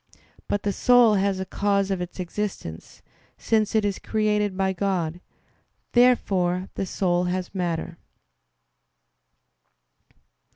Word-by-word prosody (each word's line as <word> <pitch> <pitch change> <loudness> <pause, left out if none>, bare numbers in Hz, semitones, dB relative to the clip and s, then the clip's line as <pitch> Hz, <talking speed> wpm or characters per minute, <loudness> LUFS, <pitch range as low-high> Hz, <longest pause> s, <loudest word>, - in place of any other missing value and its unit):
But 205 - -1
the 205 - 0
soul 245 -1 +5
has 195 -1 +1
a 190 - -3
cause 200 0 0
of 190 -2 -1
its 180 +1 -7
existence, 180 - -5 0.3
since 220 -1 0
it 215 -1 +3
is 200 -2 -1
created 210 -2 0
by 190 0 +1
God. 180 -3 -2 0.7
Therefore 190 -7 +2
the 195 - -3
soul 180 -2 0
has 180 +1 -3
matter. 170 -2 -3
195 Hz, 115 wpm, -24 LUFS, 180-210 Hz, 0.7 s, soul